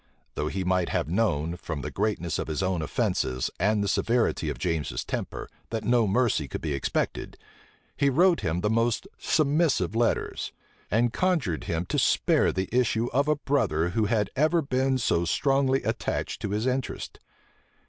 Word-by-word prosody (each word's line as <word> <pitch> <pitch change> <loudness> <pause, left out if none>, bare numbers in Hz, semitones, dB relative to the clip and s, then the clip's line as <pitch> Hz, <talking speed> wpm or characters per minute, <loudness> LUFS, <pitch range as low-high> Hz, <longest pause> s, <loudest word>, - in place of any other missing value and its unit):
Though 75 - -2
he 95 +4 -2
might 90 -1 +1
have - - -1
known, 85 -4 0
from 80 -4 -5
the - - -5
greatness 100 -5 -1
of - - -3
his 80 +4 -2
own 95 -3 0
offences, 65 -3 -1
and 105 +3 +2
the - - -1
severity 115 -7 +1
of 70 - -4
James's 75 -5 -2
temper, - - -4 0.2
that 115 -1 -3
no 120 0 +3
mercy 100 - +1
could - - -5
be 75 - -2
expected, 70 - -2 0.6
he 140 - +2
wrote 170 +6 +4
him 80 +3 -1
the 105 - +1
most 115 0 +1
submissive 145 - +1
letters, 115 0 0 0.4
and 115 +3 +2
conjured 135 - 0
him 85 -2 -2
to - - -1
spare - - +3
the 95 0 -2
issue 120 -1 +2
of 140 +3 +2
a 150 - +3
brother 110 - 0
who 105 +4 0
had 105 -2 0
ever 155 +4 +2
been 130 0 +1
so 85 -8 +1
strongly 135 - +2
attached - - -2
to 105 - -2
his 105 +3 -1
interest. 130 0 -3
105 Hz, 170 wpm, -27 LUFS, 85-130 Hz, 0.6 s, wrote